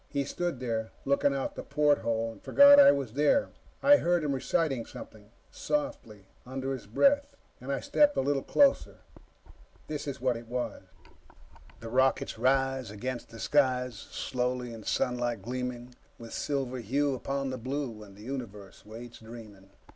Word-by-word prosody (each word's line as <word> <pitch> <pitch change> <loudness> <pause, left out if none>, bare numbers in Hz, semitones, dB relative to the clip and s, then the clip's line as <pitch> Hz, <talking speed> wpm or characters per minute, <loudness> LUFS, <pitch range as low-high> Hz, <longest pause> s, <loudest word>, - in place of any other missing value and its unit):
He 140 - -1
stood 170 0 -3
there, 115 -3 -2 0.2
looking 140 +1 +2
out 135 - -3
the - - -6
porthole, 140 -6 +1
and - - -15
forgot 285 0 +7
I 285 - +9
was 135 -5 -3
there. 150 - +2 0.3
I 290 +1 +8
heard 175 - +1
him 145 -2 0
reciting 135 -2 0
something, 105 -1 -12 0.2
softly, 280 - -3 0.2
under 135 +1 -4
his 130 - -8
breath, 280 - +2 0.3
and 130 +2 -5
I 135 - -1
stepped 290 -1 +3
a - - +3
little 140 0 0
closer. 280 - +2 0.8
This 150 -1 -5
is 140 -1 -4
what 125 -2 0
it 115 0 -11
was: 125 +1 -4 1.0
"_The 115 0 -8
rockets 130 -3 +1
rise 135 0 +1
against 120 +4 -5
the 115 - -11
skies, 125 -2 +2
Slowly; 125 +2 -3
in 115 - -9
sunlight 120 -3 -1
gleaming 125 +1 -5 0.2
With 115 -1 -10
silver 135 -3 -2
hue 140 +5 0
upon 135 +1 -3
the 130 - -5
blue. 130 -3 -4
And 100 -2 -13
the 105 - -12
universe 110 -7 -7
waits, 115 +3 -10
dreaming. 110 -4 -12
130 Hz, 160 wpm, -29 LUFS, 115-140 Hz, 1.0 s, I